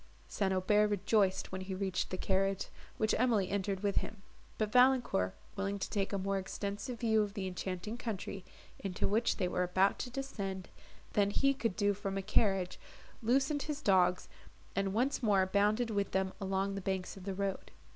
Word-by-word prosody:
St. 190 - 0
Aubert 205 +3 +3
rejoiced 200 -1 +1
when 185 0 -4
he 190 0 -4
reached 190 -1 -1
the 185 - -3
carriage, 195 +1 0 0.3
which 215 0 +2
Emily 220 -7 +2
entered 195 -1 -1
with 200 -1 0
him; 210 -2 -2 0.3
but 215 -1 0
Valancourt, 250 - +4 0.2
willing 200 0 -1
to 195 - -3
take 195 -2 -1
a 200 - 0
more 195 0 0
extensive 205 +5 -4
view 220 -2 +3
of 205 -1 -3
the 195 -3 -2
enchanting 185 +4 -4
country, 200 -4 -4 0.4
into 190 -2 -1
which 225 +4 +1
they 185 - +1
were 180 - -1
about 185 +2 +2
to 250 - -3
descend, 200 -8 -4 0.4
than 200 -1 +3
he 275 +6 +3
could 230 -7 -1
do 205 -1 +2
from 195 -1 -3
a 195 - -2
carriage, 195 -3 +1 0.4
loosened 270 +5 +2
his 300 0 -3
dogs, 185 -7 +3 0.5
and 195 0 +1
once 265 +6 +1
more 200 -5 +4
bounded 210 +4 +2
with 200 -2 -1
them 190 0 0
along 195 0 0
the 195 - -4
banks 190 -1 -2
of 190 -2 -11
the 195 -1 -3
road. 195 -1 -2
200 Hz, 185 wpm, -33 LUFS, 190-215 Hz, 0.5 s, Valancourt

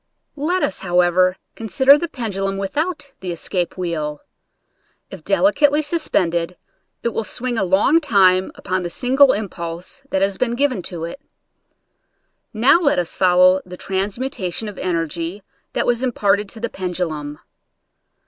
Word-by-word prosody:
Let 340 +6 0
us, 190 - -1
how 180 -1 +2
ever, 185 +1 +3 0.2
consider 245 +6 +4
the 340 +4 -2
pendulum 195 - -3
without 285 - -3
the 185 -1 -4
escape 175 +2 -3
wheel. 155 -5 -3 0.9
If 190 -5 -9
delicately 290 - +3
suspended 180 - 0 0.5
it 235 - +1
will 225 - -3
swing 245 +3 -3
a 220 - 0
long 195 - +4
time 190 - +3
upon 185 -1 -2
the 175 - -4
single 265 +7 +4
impulse 175 0 -5
that 190 0 +1
has 195 -1 -1
been 240 -2 0
given 255 -6 0
to 170 -3 -6
it. 225 +12 -8 1.3
Now 245 +9 +4
let 300 -5 +2
us 175 -2 -1
follow 185 0 +5
the 180 0 -10
transmutations 200 +1 -3
of 205 - -10
the - - -5
energy 170 +2 -2 0.3
that - - 0
was 240 0 +1
imparted 210 -5 +1
to 225 - -9
the 235 - -2
pendulum. 165 -5 -4
195 Hz, 150 wpm, -20 LUFS, 180-255 Hz, 1.3 s, follow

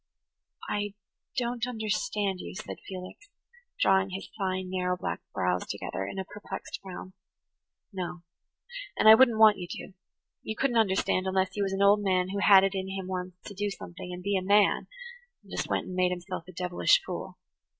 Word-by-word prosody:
"I 205 -1 -2 0.4
don't 240 -1 -1
understand 215 - -1
you," - - -7
said - - -7
Felix, 190 - -9 0.5
drawing 190 0 +4
his 190 +1 -7
fine, 185 -3 -2
narrow 180 -1 0
black 85 - -3
brows 90 0 0
together 95 - -4
in - - -6
a 190 - -3
perplexed 205 +2 -7
frown. 185 -1 -8 0.8
"No–and 190 - -5
I 220 - +12
wouldn't 235 -1 +6
want 215 -2 +7
you 175 - -5
to. - - -7 0.5
You 220 - -4
couldn't 250 0 +1
understand 190 -3 +2
unless 190 0 0
you 205 - -1
was 195 -1 0
an 195 +1 +1
old 205 +1 +6
man 185 -2 +2
who 200 +1 -2
had 195 -1 +7
it 195 0 +1
in 190 -1 -3
him 190 -1 -4
once 185 -1 -4
to 205 - -7
do 205 +1 -1
something 180 -2 -8
and 180 0 -7
be 200 +1 0
a 190 - +1
man, 200 +2 +3 0.6
and - - -18
just - - -3
went - - 0
and 185 - -7
made 180 0 +2
himself 180 -1 -5
a - - -9
devilish 180 - +3
fool. - - -6
190 Hz, 180 wpm, -29 LUFS, 185-210 Hz, 0.8 s, I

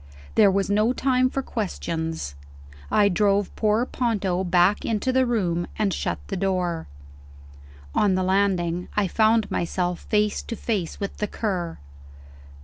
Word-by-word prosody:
There 200 - +6
was 195 0 +1
no 215 +4 +2
time 255 -1 +2
for 270 +1 -3
questions; 165 - -3 0.6
I 205 -1 +4
drove 200 0 +1
poor 215 +2 +2
Ponto 200 -8 -1
back 180 +2 +3
into 225 +3 0
the 260 -1 +3
room, 175 -7 0
and 205 -3 +1
shut - - -2
the - - -4
door. 180 -3 -1 1.1
On 200 -3 +3
the 185 - +1
landing, 185 -2 +1
I 210 -2 +2
found 220 +2 +2
myself 175 0 -1
face 210 -1 0
to 230 - -6
face 205 -6 -3
with 200 - -4
the 210 - -1
Cur. 180 -7 -3
200 Hz, 145 wpm, -24 LUFS, 180-215 Hz, 1.1 s, There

